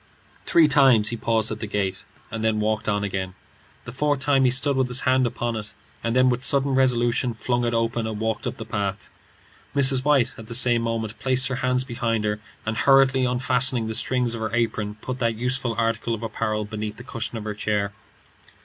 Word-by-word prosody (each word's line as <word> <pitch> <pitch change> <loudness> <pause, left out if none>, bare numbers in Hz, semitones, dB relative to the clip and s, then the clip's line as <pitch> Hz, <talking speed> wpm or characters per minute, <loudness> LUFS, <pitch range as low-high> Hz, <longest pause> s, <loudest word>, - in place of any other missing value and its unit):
Three 165 -2 +5
times 130 -7 +4
he 120 - -3
paused 115 -1 +1
at 110 - -4
the 110 - -5
gate, 100 -2 -3 0.3
and 115 -1 -4
then 110 -1 +1
walked 105 0 -1
on 105 -1 0
again. 95 -2 -4 0.5
The 120 - -7
fourth 145 +3 0
time 135 -1 +2
he - - +5
stood 135 +3 +1
with 130 -1 +1
his 125 +1 +1
hand 130 -1 +2
upon 120 0 -3
it, 105 -1 -6 0.3
and 115 +1 -1
then 130 0 +4
with 125 -1 +1
sudden 135 0 +4
resolution 120 -2 +1
flung 120 +1 -1
it 120 - -1
open 115 0 -1
and 110 -1 -5
walked 110 0 -2
up - - -5
the 110 - -7
path. 100 -2 -4 0.6
Mrs. 135 -2 +3
White 140 -4 +2
at 110 - -10
the 115 - -4
same 120 -1 +4
moment 115 -1 -3
placed 130 0 +1
her 125 - -2
hands 125 -1 +1
behind 120 -3 -2
her, 105 0 -1 0.3
and 110 0 -2
hurriedly 135 -1 +4
unfastening 125 -1 +2
the 110 - -3
strings 125 +1 0
of 115 - -5
her 110 - -2
apron, 110 -3 -1
put 130 0 -5
that 115 -2 0
useful 125 0 -1
article 115 0 0
of 115 - -9
apparel 110 -1 -2
beneath 105 0 -5
the 125 - -10
cushion 115 -1 -5
of 110 - -6
her 105 -1 -4
chair. 105 -1 -2
115 Hz, 210 wpm, -23 LUFS, 110-130 Hz, 0.6 s, Three